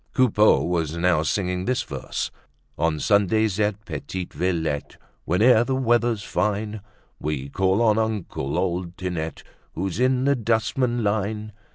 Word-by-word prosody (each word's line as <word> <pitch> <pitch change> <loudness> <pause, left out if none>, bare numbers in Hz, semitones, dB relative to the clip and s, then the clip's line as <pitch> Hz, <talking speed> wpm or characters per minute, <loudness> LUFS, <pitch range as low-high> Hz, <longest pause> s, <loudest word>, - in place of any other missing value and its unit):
Coupeau 110 -5 +4
was 85 -2 -1
now 85 -2 +3
singing 90 +2 -1
this 130 0 0
verse: - - -4 0.4
"On 80 0 0
Sundays 105 +1 +2
at 105 0 0
Petite 85 +3 -5
Villette, 80 -5 -2 0.3
Whene'er 110 +7 +5
the 130 +2 -1
weather's 120 -4 +1
fine, 105 0 -1 0.4
We 70 -2 -3
call 95 +7 +2
on 110 -1 +4
uncle, 105 -11 -2
old 90 -1 -2
Tinette, 85 -4 -4 0.3
Who's 95 +2 -3
in 130 0 +2
the 140 0 +4
dustman 120 +1 0
line. 105 +1 -1
100 Hz, 135 wpm, -24 LUFS, 90-110 Hz, 0.4 s, Whene'er